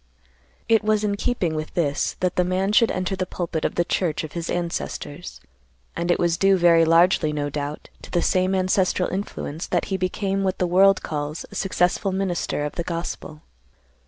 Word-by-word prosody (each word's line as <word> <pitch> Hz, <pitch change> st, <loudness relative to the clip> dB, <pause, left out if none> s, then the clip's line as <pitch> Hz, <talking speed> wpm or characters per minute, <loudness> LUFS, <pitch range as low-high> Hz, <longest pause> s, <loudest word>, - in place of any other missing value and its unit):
"It 225 Hz, -1 st, +4 dB
was 215 Hz, 0 st, +1 dB
in 205 Hz, -1 st, +1 dB
keeping 195 Hz, -6 st, -1 dB
with 155 Hz, 0 st, -5 dB
this 145 Hz, -5 st, 0 dB
that 180 Hz, -1 st, 0 dB
the 180 Hz, -, +3 dB
man 185 Hz, +2 st, 0 dB
should 225 Hz, +2 st, +4 dB
enter 185 Hz, +1 st, -2 dB
the 185 Hz, -1 st, -3 dB
pulpit 165 Hz, -3 st, -3 dB
of -, -, -1 dB
the 175 Hz, -, +1 dB
church 170 Hz, -4 st, -1 dB
of 155 Hz, -, -7 dB
his 170 Hz, +1 st, -5 dB
ancestors, 175 Hz, -2 st, -4 dB, 0.6 s
and 170 Hz, +1 st, -2 dB
it 175 Hz, -, +3 dB
was 170 Hz, -1 st, +1 dB
due 195 Hz, +1 st, +4 dB
very 170 Hz, -2 st, +5 dB
largely, 165 Hz, -1 st, +4 dB
no 145 Hz, -1 st, -2 dB
doubt, 145 Hz, +1 st, -5 dB
to -, -, -11 dB
the 175 Hz, -, 0 dB
same 185 Hz, +1 st, +2 dB
ancestral 185 Hz, 0 st, +1 dB
influence 180 Hz, -4 st, -4 dB
that -, -, 0 dB
he -, -, +1 dB
became 195 Hz, +1 st, -1 dB
what 190 Hz, -1 st, 0 dB
the 180 Hz, -, +1 dB
world 190 Hz, +2 st, +4 dB
calls 150 Hz, +1 st, -4 dB
a -, -, -11 dB
successful 190 Hz, +1 st, 0 dB
minister 185 Hz, -5 st, -1 dB
of 150 Hz, -, -4 dB
the 170 Hz, -, -1 dB
gospel. 165 Hz, -2 st, -5 dB
180 Hz, 190 wpm, -23 LUFS, 165-190 Hz, 0.6 s, very